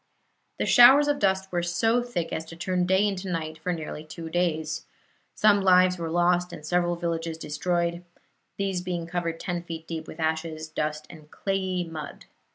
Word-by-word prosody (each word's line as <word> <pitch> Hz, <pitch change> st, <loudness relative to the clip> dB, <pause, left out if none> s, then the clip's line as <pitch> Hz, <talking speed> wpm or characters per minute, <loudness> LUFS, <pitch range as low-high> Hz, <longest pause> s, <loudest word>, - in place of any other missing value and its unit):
The -, -, 0 dB
showers 265 Hz, +4 st, +8 dB
of 290 Hz, -1 st, +1 dB
dust 190 Hz, -1 st, +1 dB
were 175 Hz, -1 st, 0 dB
so 225 Hz, +8 st, +1 dB
thick 240 Hz, -9 st, -3 dB
as 160 Hz, -, -2 dB
to 165 Hz, -, -10 dB
turn 180 Hz, +1 st, -1 dB
day 190 Hz, +3 st, +3 dB
into 195 Hz, -1 st, -3 dB
night 160 Hz, -2 st, -3 dB
for 180 Hz, +3 st, -2 dB
nearly 155 Hz, -2 st, -5 dB
two 160 Hz, +1 st, -8 dB
days. 160 Hz, -3 st, -1 dB, 0.5 s
Some 205 Hz, -1 st, +4 dB
lives 185 Hz, -1 st, +5 dB
were 165 Hz, -1 st, -3 dB
lost, 175 Hz, +1 st, +2 dB
and 150 Hz, -, -9 dB
several 175 Hz, +1 st, +1 dB
villages 165 Hz, -1 st, -3 dB
were -, -, -20 dB
destroyed, 170 Hz, +3 st, -1 dB, 0.5 s
these 195 Hz, -2 st, -1 dB
being 175 Hz, -2 st, -3 dB
covered 170 Hz, -1 st, -3 dB
ten 175 Hz, -2 st, -3 dB
feet 165 Hz, -1 st, -7 dB
deep 160 Hz, -1 st, -5 dB
with 160 Hz, -, -10 dB
ashes, 160 Hz, 0 st, -2 dB
dust 150 Hz, 0 st, -3 dB
and 155 Hz, -3 st, -14 dB
clayey 190 Hz, -1 st, -2 dB
mud. 155 Hz, -3 st, -8 dB
175 Hz, 180 wpm, -26 LUFS, 160-185 Hz, 0.5 s, showers